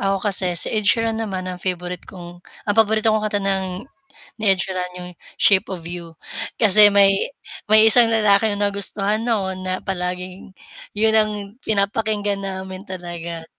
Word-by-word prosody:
Ako 195 0 0
kasi 185 -3 -1
si - - -1
Ed 215 -2 0
Sheeran 225 -1 +1
naman 190 -4 -4
ang 180 -1 -7
favorite 180 -1 -5
kong 175 -2 -12 0.3
ang 205 - +1
paborito 220 0 +2
kong 215 0 -1
kanta 205 -1 -2
ng 190 +1 -2 0.6
ni 215 - -3
Ed 190 - 0
Sheeran 185 -2 -4
'yong 180 0 -9 0.3
Shape 195 -2 +3
of 170 -3 -8
You. 170 -2 -7 0.5
Kasi 210 -1 +6
may 200 -1 +7 0.6
may 215 +1 +9
isang 235 0 +6
lalaki 210 -1 +2
na 205 0 -1
nagustuhan 200 +2 -3
noon 190 -5 -2
na 185 0 -3
palaging 180 0 -5 0.4
'yon 220 +1 +3
ang 215 -1 +3 0.3
pinapakinggan 205 -1 +1
namin 190 0 -7
talaga. 170 -3 -7
195 Hz, 160 wpm, -20 LUFS, 185-215 Hz, 0.6 s, may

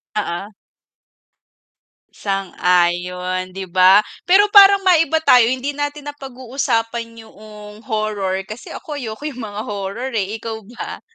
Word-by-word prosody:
Oo. 200 0 -4 1.6
Sang-ayon 180 -1 -1
'di 190 0 -6
ba? 185 +2 +6 0.3
Pero 385 +4 +5
parang 400 -1 +8
maiba 330 -4 +4
tayo 250 -7 +6
hindi 260 +3 -2
natin 290 0 -4
napag-uusapan 240 -4 -4
yung 210 -1 -13
horror, 205 -4 -2
kasi 215 +3 -10
ako 300 - -7
ayoko 230 -1 -7
yung 270 -5 -5
mga 210 -1 -6
horror 205 +5 -5
eh, 210 0 -2
ikaw 220 0 -6
ba? 245 - -8
220 Hz, 120 wpm, -19 LUFS, 195-265 Hz, 1.6 s, parang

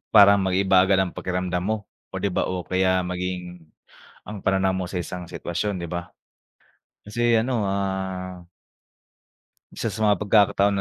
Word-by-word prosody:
parang 100 -1 +9
mag-iiba 95 0 +4
agad 95 0 +3
ang 95 -2 -1
pakiramdam 90 -1 -2
mo. 110 +3 0 0.4
Oh, - - -4
'di - - 0
ba, 95 - 0
o 90 0 -2
kaya 95 0 +2
maging 90 -2 -5 0.5
ang 105 -1 -7
pananaw 95 0 +2
mo 95 -1 -2
sa 90 - -8
isang 90 0 -7
sitwasyon, 85 +3 -3
'di 85 - -6
ba? 85 0 -4 1.0
Kasi 120 +1 +2
ano, 120 -1 0
ah 95 -2 -3 1.3
isa - - -4
sa 110 - -3
mga 105 -3 +4
pagkakataon 100 -1 +3
95 Hz, 150 wpm, -24 LUFS, 90-100 Hz, 1.3 s, parang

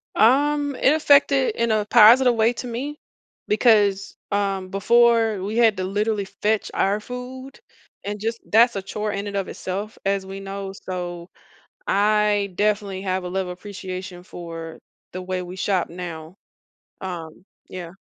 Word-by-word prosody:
Um, 285 +4 +3
it 270 - +3
affected 280 -3 +4
in 235 -1 0
a 215 -1 +1
positive 240 +3 +7
way 225 +1 +3
to 245 +1 -6
me, 275 +6 -5 0.5
because, 205 -3 +3 0.2
um, 195 -2 -1
before 225 +1 +3
we 210 +3 -3
had 225 -4 +4
to 185 - -2
literally 205 +2 -1
fetch 210 +2 -1
our 200 +2 +1
food 255 +4 -8 0.4
and 205 +1 -4
just 225 +2 -3
that's 235 +3 +5
a 195 - -2
chore 210 +2 -4
in 200 0 -4
and 200 - -5
of 195 -1 -1
itself 200 +4 -5
as 195 -1 0
we 195 +1 -7
know, 195 0 -6
so, 175 -1 -5 0.6
I 210 0 +2
definitely 205 -2 0
have 190 -1 -1
a - - -4
level 185 0 -3
appreciation 185 -1 -8
for 165 -2 -8 0.3
the 185 - -5
way 185 0 -3
we 180 0 -8
shop 190 -2 0
now, 170 -2 -8 0.7
um, 175 -2 -7 0.2
yeah, 175 -2 -7
200 Hz, 155 wpm, -23 LUFS, 185-225 Hz, 0.7 s, positive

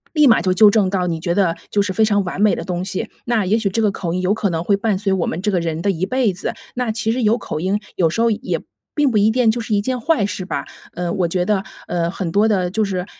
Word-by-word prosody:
立 300 -2 +6
马 230 - +5
就 185 +1 +1
纠 205 +2 +7
正 205 -3 +2
到 185 -2 0
你 165 - -2
觉 170 +1 -1
得 185 -4 +2
就 205 - +2
是 200 - -2
非 220 +3 +3
常 205 -2 +2
完 180 +1 -5
美 210 0 +4
的 - - -5
东 180 -1 -3
西， 190 -1 -4 0.2
那 230 -4 +1
也 210 +5 +2
许 220 - 0
这 225 +4 -1
个 210 - +3
口 175 -3 -4
音 185 - -1
有 185 +2 +1
可 210 -2 0
能 165 -1 -2
会 200 +3 +2
伴 205 -1 0
随 195 -1 0
我 185 -3 0
们 180 - -3
这 210 - +1
个 185 - +1
人 165 0 -3
的 200 - +2
一 185 0 -1
辈 255 -3 +1
子。 180 - -4 0.2
那 245 -3 -1
其 220 0 -1
实 250 0 -1
有 220 +2 +3
口 155 - -5
音， 195 +4 0 0.2
有 170 -3 +3
时 225 - -2
候 230 - +3
也 225 +4 -2 0.3
并 290 -3 +2
不 215 - +2
一 210 +2 +4
定 245 -2 +3
就 235 +2 -2
是 225 -2 -2
一 200 - +3
件 255 +2 -2
坏 255 -5 +1
事 195 -2 -3
吧。 185 - -4 0.3
呃， 175 -1 -2
我 185 -3 0
觉 180 +1 0
得 200 0 0 0.2
呃， 170 -1 0
很 185 -4 -3
多 205 +5 +3
的 185 -5 +1
就 215 +2 0
是 185 -2 -3
200 Hz, 325 characters per minute, -19 LUFS, 180-220 Hz, 0.3 s, 纠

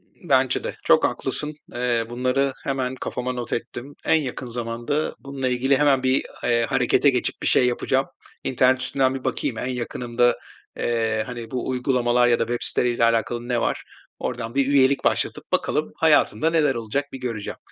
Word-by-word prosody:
Iıı, - - -16
bence - - +3
de. - - -4
Çok - - +5
haklısın. 150 0 -2 0.2
Eee, 120 -2 0
bunları 130 +3 0
hemen 130 -1 -2
kafama 125 0 -3
not 120 -1 -4
ettim. 125 +4 -5
En - - +4
yakın 135 -4 -2
zamanda 120 +5 -3
bununla 135 -2 -4
ilgili 130 +2 +2
hemen 140 -2 +3
bir, 130 +1 +2 0.2
eee, 120 -1 +2
harekete 135 +1 +3
geçip 125 -2 -2
bir - - -1
şey 125 - +4
yapacağım. 130 +2 0 0.4
İnternet 130 0 +2
üstünden 130 0 +1
bir 130 - -6
bakayım 115 - -2
en - - -3
yakınımda, 120 -1 0 0.4
eee, 110 -2 0
hani, 120 -2 -7
bu 125 -1 -3
uygulamalar 125 -1 +2
ya 120 -1 +3
da - - +3
web 120 +1 -3
siteleriyle 120 -1 +1
alakalı 115 +1 +1
ne 120 -2 0
var. - - -1 0.4
Oradan 120 -1 -4
bir 135 -1 +2
üyelik 140 -1 +3
başlatıp - - -1
bakalım - - 0
hayatımda 155 +10 +3
neler 150 -5 +2
olacak 115 +5 -2
bir 135 - -6
göreceğim. 115 -5 -4
125 Hz, 175 wpm, -23 LUFS, 120-135 Hz, 0.4 s, Çok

